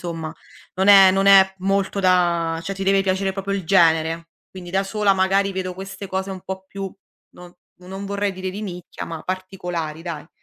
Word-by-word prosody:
insomma 165 -2 -5 0.4
non 190 +2 +1
è 195 -2 +9
non 195 +1 +1
è 195 -1 +7
molto 195 +1 -1
da 175 -3 +2
cioè 195 - -4
ti 195 - -4
deve 195 0 +3
piacere 190 0 0
proprio 195 0 -4
il 195 -3 -3
genere. 165 -2 +2 0.2
Quindi 180 -2 -10
da 190 +2 +1
sola 205 0 +1
magari 195 +1 +1
vedo 185 -1 -4
queste 195 +2 -8
cose 190 +1 -3
un 190 -1 -6
po' 190 0 -6
più 195 0 -6 0.4
no 180 0 -14 0.2
non 190 +2 -8
vorrei 200 0 -1
dire 185 0 -5
di 200 +3 -7
nicchia, 180 -4 -7
ma 165 -2 -7
particolari 180 -4 -5
dai. 165 -3 -7
190 Hz, 190 wpm, -21 LUFS, 175-195 Hz, 0.4 s, è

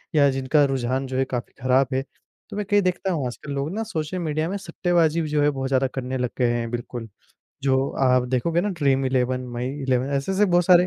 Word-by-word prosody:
या 140 -2 +6
जिनका 135 +3 +2
रुझान 130 0 -1
जो 130 - -3
है 135 - +2
काफ़ी 125 -2 -4
खराब 130 0 +4
है, 130 - +1 0.5
तो 205 - -6
मैं 210 - -2
कई 205 0 +4
देखता 185 +1 0
हूँ, 150 -6 -1
आजकल 125 +4 -7
लोग 140 +4 -2
ना 225 - -1
सोशल 180 -4 -3
मीडिया 155 0 -1
में 200 - -2
सट्टेबाज़ी 170 -3 +1
भी 155 - -2
जो 150 0 +1
है, 145 - +4
बहुत 135 -2 -2
ज़्यादा 130 0 +2
करने 130 0 -3
लग 125 -1 -1
गए 125 -2 +2
हैं, 120 -1 -1
बिल्कुल। 120 -1 -5 0.6
जो 135 -1 +3 0.3
आप 130 -1 +4
देखोगे 160 +7 +1
ना, 205 - -1
ड्रीम 140 -7 +1
11, 130 0 0
माई 120 +1 -3 0.2
11, 130 0 +1
ऐसे-ऐसे 190 +9 +1
बहुत 175 -2 +3
सारे 180 0 +6
135 Hz, 225 wpm, -24 LUFS, 130-170 Hz, 0.6 s, या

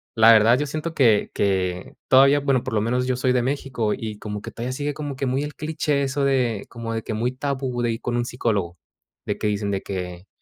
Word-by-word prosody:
La 115 +1 +7
verdad 115 +3 +6
yo 150 - 0
siento 155 +3 -4
que 115 -6 +3
que 95 -2 -1
todavía, 140 +2 +6
bueno, 135 -3 +2
por - - -5
lo 105 - +2
menos 125 +3 0
yo 130 - +1
soy 130 0 +1
de 125 -1 +2
México 130 -4 -1
y 110 -2 -6
como 105 -1 -5
que - - -8
todavía 125 +2 -4
sigue, 145 +2 -2
como 145 -3 -5
que 135 - -2
muy 130 +3 0
el 150 -1 -6
cliché 150 -2 -1
eso 140 +1 0
de 125 -6 +1
como 115 -1 -5
de 115 - -2
que - - -4
muy 120 +3 0
tabú 130 -2 -2
de 120 - +1
ir 115 - -5
con 120 0 -1
un 120 - 0
psicólogo. 105 -8 -2 0.5
De - - -2
que - - -1
dicen 105 -1 -1
de 95 - -1
que: 90 -1 -6
120 Hz, 240 wpm, -23 LUFS, 105-135 Hz, 0.5 s, La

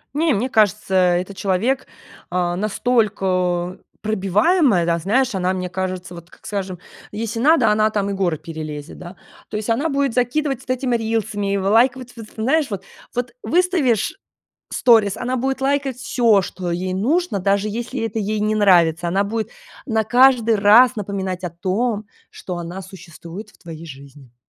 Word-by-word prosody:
Не, 315 0 +2
мне 235 +4 0
кажется, 210 -3 +1
это 180 +1 +2
человек, 205 +7 -1 0.4
а, 175 -1 0
настолько 190 -5 0 0.2
пробиваемая, 215 - +2
да, 170 0 +1
знаешь, 240 +9 +1
она, 185 -1 0
мне 185 -1 -3
кажется, 185 -1 -4
вот, 170 0 -11
как - - -20
скажем, 195 -3 -4 0.3
если 225 +2 -4
надо, 265 -4 +4
она 215 +1 +3
там 205 -2 -1
и - - -2
горы 180 -5 0
перелезет, 155 -2 -8
да. 180 0 -10 0.3
То 210 - -3
есть 215 +2 -4
она 280 +8 0
будет 275 -3 0
закидывать 260 +2 0
вот - - -19
этими 255 -1 0
рилсами, 215 -3 -2
и - - +1
вы 195 0 0
лайковать 245 +3 +2
вот 225 -2 -9
в - - -20
знаешь, 270 +6 +1
вот. 200 -3 -5 0.3
Вот 245 -1 -2
выставишь 340 - +1 0.6
сторис, 220 -5 +4
она 250 +1 -2
будет 265 +2 -1
лайкать 275 -1 0
всё, 230 -5 +3
что 180 -1 -5
ей 185 +2 -2
нужно, 260 - 0
даже 200 +2 +1
если 240 +4 -4
это 225 -1 -2
ей 215 +1 -1
не 215 +1 +1
нравится. 175 -5 +4
Она 195 +4 +1
будет 220 +1 -3 0.3
на 220 -4 0
каждый 245 -1 +4
раз 220 +5 +6
напоминать 190 -2 -4
о 175 - -3
том, 205 +5 -2 0.2
что 180 -2 -7
она 175 +2 -6
существует 175 +2 -11
в - - -25
твоей 165 -1 -10
жизни. 140 -4 -13
210 Hz, 170 wpm, -20 LUFS, 185-245 Hz, 0.6 s, раз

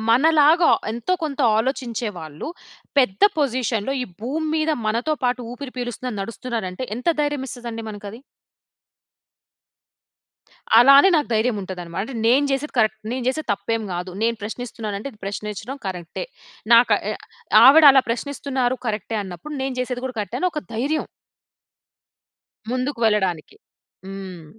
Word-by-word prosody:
మన 245 +6 +4 0.2
లాగా 325 +4 +5 0.2
ఎంతో 240 +11 -1
కొంత 290 -1 -4 0.2
ఆలోచించే 240 -2 -2
వాళ్ళు, 155 - -7 0.5
పెద్ద 195 -7 +2 0.2
పొజిషన్‌లో 250 -3 0
ఈ - - -2 0.2
భూమి 300 +7 -2
మీద 310 0 +1 0.2
మనతో 235 +8 0
పాటు 250 0 +1
ఊపిరి 260 0 -8
పీలుస్తున్నారు, 245 -1 -4
నడుస్తున్నారంటే 230 0 -5
ఎంత 250 +6 -3
ధైర్యం 290 -2 -1
ఇస్తదండి 235 -2 -6
మనకు 205 0 -9
అది. 235 - -11 2.6
అలా 270 +3 +8
అని, 385 - +7
నాకు 295 - 0
ధైర్యం 220 +1 +1
ఉంటది 185 -1 -6
అన్నమాట. 175 +5 -5 0.2
నేను 265 +5 +4
చేసేది 270 +2 -2
కరెక్ట్. 215 -1 +2
నేను 255 - -3
చేసేది 310 0 -3
తప్పేం 220 +3 -2
గాదు. 180 +1 -4
నేను 230 0 +1
ప్రశ్నిస్తున్నాను 220 -1 -5
అంటే, 275 +7 -6
ప్రశ్నించడం 210 +5 -5
కరెక్టే. 180 - -5 0.5
నాక 235 +1 +7 0.2
ఆయ - - -1 0.5
ఆవిడ, 305 +4 +9
అలా 265 -1 +5
ప్రశ్నిస్తున్నారు 260 0 -1
కరెక్టే 215 0 -2
అన్నప్పుడు, 195 - -8
నేను, 265 -1 -2
చేసేది 250 0 -3
కూడా 250 -3 -7
కరెక్టే. 210 +4 -4
అని 365 - +2
ఒక 300 - -4
ధైర్యం. 285 +7 -1 1.7
ముందుకు 255 +1 -2
వెళ్ళడానికి. 190 - 0 0.5
హ్మ్. 190 -3 -8
240 Hz, 135 wpm, -22 LUFS, 210-270 Hz, 2.6 s, ఆవిడ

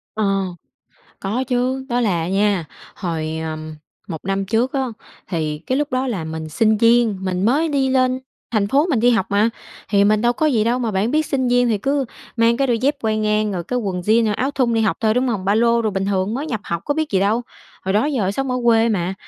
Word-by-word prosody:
Ờ, 195 -2 +1 0.7
có 220 +7 -2
chứ. 255 +2 0
Đó 245 +1 +1
là 180 -7 +1
à 165 - -3
nha, 195 -3 +1 0.3
hồi, 160 -4 -3
ờ, 155 -1 -4 0.5
1 165 -4 -4
năm 195 0 -1
trước 235 +6 0
á, 270 - +1 0.5
thì 155 -4 -2
cái 260 - -2
lúc 295 -1 -1
đó 255 +1 0
là 195 -9 -2
mình 160 0 -5
sinh 215 +6 +2
viên, 230 -2 +4
mình 185 +1 -1
mới 295 +8 +2
đi 275 -2 +1
lên 255 -1 +2 0.3
thành 205 -3 +1
phố 285 +7 +3
mình 260 -8 +2
đi 245 +2 +4
học 225 -6 +2
mà, 205 +3 +3 0.4
thì 200 -1 +4
mình 210 +1 +3
đâu 240 0 +3
có 310 - 0
gì 235 -8 +2
đâu, 240 +2 +1
mà 230 -3 -1
bạn 200 +4 0
biết 310 +1 +2
sinh 260 -3 0
viên 245 0 +3
thì 220 -3 +1
cứ 275 +5 0 0.3
mang 230 +1 +3
cái 275 -1 +1
đôi 235 -2 +1
dép 280 +4 +1
quai 220 -1 0
ngang 215 0 +1
rồi 175 -2 -3
cái 250 +7 -2
quần 190 -5 -3
jean, 220 +3 +3
à, - - +1
áo 260 +7 -1
thun 250 -4 +1
đi 225 - +2
học 220 - +1
thôi, 220 -1 +2
đúng 250 +1 +1
hông? 200 -6 -2
Ba 200 - +3
lô 235 +1 +3
đồ, 220 - 0
bình 195 -1 -2
thường 195 +1 0
mới 280 +6 -3
nhập 225 -7 -2
học 170 -1 -3
có 290 - +1
biết 315 0 -1
gì 190 - +2
đâu, 210 +5 +2 0.4
hồi 190 - 0
đó 215 +6 +3
giờ 235 -10 0
sống 270 +3 -2
ở 250 - 0
quê 230 -1 +4
mà. 185 -3 -1
225 Hz, 250 wpm, -20 LUFS, 195-250 Hz, 0.7 s, viên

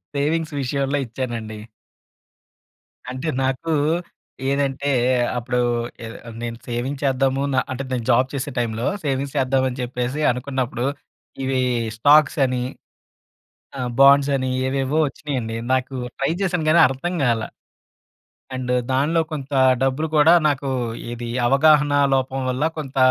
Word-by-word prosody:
Savings 155 +3 0
విషయంలో 140 +2 -1
ఇచ్చానండి. 115 -2 -5 1.5
అంటే 130 +5 -5 0.2
నాకు 135 +5 -1 0.8
ఏదంటే 140 0 0 0.5
అప్పుడూ 125 +1 -2 0.5
ఏదో 115 - -8
ఆహ్, 115 - -9
నేను 115 -1 -4
సేవింగ్స్ 125 +4 -3
చేద్దాము 135 0 +1
నా 130 - +3
అంటే, 130 +1 -3
నేను 120 -3 -2
జాబ్ 130 +1 +3
చేసే 140 +1 -3
టైంలో, 115 +1 -2 0.2
సేవింగ్స్ 140 0 -2
చేద్దామని 130 -1 +1
చెప్పేసి 125 +4 -3
అనుకున్నప్పుడు, 130 0 -3 0.6
ఇవి 130 0 0 0.4
స్టాక్స్ 145 +4 +5
అని, 125 -1 -1 1.2
ఆహ్, 125 -1 -2
బాండ్స్ 140 +1 +6
అని 130 -1 -2 0.2
ఏవేవో 135 +3 0
వచ్చినియండి. 125 -6 -4 0.2
నాకు 130 +1 -2 0.2
ట్రై 135 +4 +1
చేశాను 180 -4 0
కానీ 170 - +6
అర్థం 135 +7 -3
కాలా. 115 -3 0 1.1
అండ్ 125 -1 -3 0.2
దానిలో 150 +5 +2
కొంత 140 -2 -6 0.3
డబ్బులు 135 +4 0
కూడా 155 +3 +6
నాకు 140 -1 -1 0.4
ఏది 120 0 -5 0.2
అవగాహన 145 +2 +4 0.2
లోపం 130 0 -1
వల్ల 130 +3 -1
కొంత 135 -3 -6
135 Hz, 120 wpm, -22 LUFS, 125-145 Hz, 1.5 s, బాండ్స్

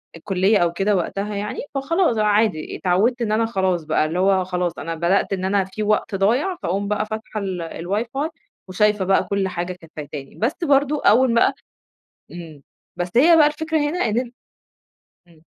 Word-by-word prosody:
الكلية 195 +4 +1
أو 170 -2 +1
كده، 195 +3 +1
وقتها 200 +3 -2
يعني، 205 +1 -4 0.2
فخلاص 275 - +1
عادي، 210 -5 +1
اتعوّدت 210 +7 +1
إن 215 -2 -1
أنا 225 +1 +2
خلاص 190 -6 0
بقى، 155 0 +1
اللي 165 +3 -2
هو 190 0 +3
خلاص 180 -1 -2
أنا 165 +2 -4
بدأت 175 +4 +1
إن 190 -1 -2
أنا 195 0 +2
في 195 +3 -5
وقت 210 0 0
ضايع، 245 - +1
فأقوم 200 +3 -1
بقى 210 +1 -1
فاتحة 220 0 -5
ال 190 -3 -4
الواي 175 +6 -3
فاي 290 +4 -1 0.4
وشايفة 210 +1 +1
بقى 195 +1 +3
كل 200 -1 -1
حاجة 180 0 -4
كانت 165 -3 -17
فايتاني، 145 -2 -8
بس 235 +8 0
برضه 285 0 +2
أوّل 240 +3 +5
بقى 235 +3 +3 0.8
إمم، 160 -5 -10 0.3
بس 175 0 -2
هي 330 +7 +6
بقى 305 -2 +6
الفكرة 315 +1 -1
هنا 295 +4 -1
إن 220 +2 0
أن 245 -1 -3 1.0
إمم. 160 -2 -22
200 Hz, 180 wpm, -21 LUFS, 180-230 Hz, 1.0 s, هي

